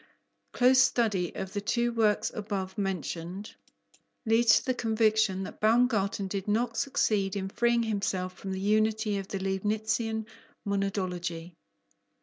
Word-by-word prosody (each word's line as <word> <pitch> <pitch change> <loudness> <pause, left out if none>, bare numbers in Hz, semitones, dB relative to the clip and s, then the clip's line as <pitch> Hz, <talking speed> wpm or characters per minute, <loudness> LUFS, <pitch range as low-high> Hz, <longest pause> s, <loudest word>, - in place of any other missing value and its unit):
Close 255 +1 +5
study 210 -9 +1
of 190 0 -5
the 205 - -2
two 240 +3 0
works 215 -2 +1
above 195 -3 -4
mentioned 190 -1 -4 0.7
leads 225 0 +5
to - - -3
the 255 - +1
conviction 220 -4 +1
that - - -9
Baumgarten 215 -3 +2
did 195 0 -4
not 225 +2 0
succeed 210 -7 0
in 195 -1 -3
freeing 235 +2 +2
himself 195 -4 -2
from 190 +1 -7
the 190 - -3
unity 215 +1 +1
of 195 - -7
the 195 - -4
Leibnitzian 215 +3 -1 0.4
monadology. 180 -4 -2
210 Hz, 130 wpm, -28 LUFS, 190-225 Hz, 0.7 s, Close